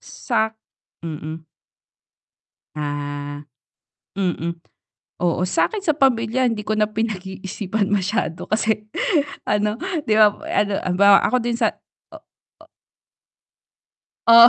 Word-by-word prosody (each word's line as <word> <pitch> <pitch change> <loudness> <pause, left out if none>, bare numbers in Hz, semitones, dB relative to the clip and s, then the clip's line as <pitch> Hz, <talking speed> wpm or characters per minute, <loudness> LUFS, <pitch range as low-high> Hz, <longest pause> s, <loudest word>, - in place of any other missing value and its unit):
Sa'k 220 0 -1 0.5
mm. 155 0 -6 1.3
Ah. 145 0 -4 0.7
Mm. 170 -3 -1 0.6
Oo, 175 +1 +1
sa'kin 400 - 0
sa 310 - +4
pamilya 255 -3 +2
hindi 210 -2 -3
ko 215 - -1
na 215 0 +2
pinag-iisipan 200 -1 -3
masyado 195 -2 -1
kasi 215 0 0 0.6
ano, 210 +1 +1 0.3
'di 215 - +4
ba 215 -1 +7 0.2
ano 205 -1 +1
halimbawa 195 +2 +5
ako 255 - +2
din 235 -1 -1
sa - - +4 0.5
o - - -7 0.5
o - - -26 1.6
Oh. 235 +1 +11
205 Hz, 105 wpm, -22 LUFS, 175-220 Hz, 1.6 s, Oh